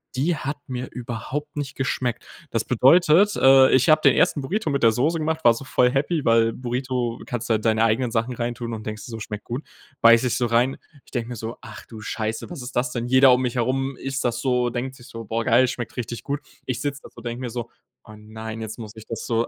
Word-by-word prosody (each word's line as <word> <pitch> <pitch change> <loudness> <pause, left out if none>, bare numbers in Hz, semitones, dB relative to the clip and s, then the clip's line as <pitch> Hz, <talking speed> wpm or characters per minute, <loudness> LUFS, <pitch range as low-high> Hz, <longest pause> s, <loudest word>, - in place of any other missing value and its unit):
die 155 +6 +1
hat 145 +3 -4
mir 125 0 -5
überhaupt 125 +5 -5
nicht 140 -2 -3
geschmeckt. 125 -2 -2 0.3
Das - - -1
bedeutet, 175 +8 +5
äh, 135 0 +6
ich 130 +5 +4
habe 155 0 +6
den - - +6
ersten 145 - +2
Burrito 180 +6 -2
mit 140 -2 -1
der 115 - +7
Soße 145 +9 +1
gemacht, 160 +1 -2
war 120 -1 +6
so 135 - -8
voll 125 -1 +3
happy, 145 +3 0
weil 115 0 +3
Burrito 125 -1 -3
kannst 120 -1 -4
du - - +4
halt 110 +1 -1
deine 110 0 +3
eigenen 115 +2 +1
Sachen 115 +2 -1
reintun 120 0 -3
und 110 - -9
denkst 110 -1 -6
dir - - -10
so: 115 - -6
„Schmeckt 105 -1 -6
gut.“ 125 +5 -5 0.4
Beiße 115 +2 +6
ich 125 - 0
so 120 - +1
rein. 120 +3 +2 0.3
Ich - - -20
denke 120 -2 -3
mir 120 - -5
so: 115 +2 -6
„Ach 110 -2 -10
du 110 -2 -10
Scheiße, 110 +1 -3
was 165 - -7
ist 125 +1 -8
das 125 0 0
denn?“ 120 0 -3
Jeder 130 +1 +6
um 125 - +2
mich 125 -1 -2
herum 130 +2 -1
isst 135 0 -3
das 120 -1 -1
so, 125 -1 +1
denkt 125 +2 -4
sich 120 +1 -15
so: 115 -2 -8
„Boah, 115 +2 -2
geil, 125 +1 +5
schmeckt 120 0 -5
richtig 120 -1 -4
gut.“ 145 +1 -3 0.3
Ich 125 -2 -2
sitze 145 -1 -3
da - - -11
so, - - -14
denke 120 +1 -5
mir 125 - -3
so: 120 0 -6 0.3
„Oh 110 - -13
nein, 110 +1 -8
jetzt 110 +1 -6
muss 110 -1 -9
ich 110 0 -12
das 115 - -5
so 115 0 0
125 Hz, 250 wpm, -23 LUFS, 115-135 Hz, 0.4 s, der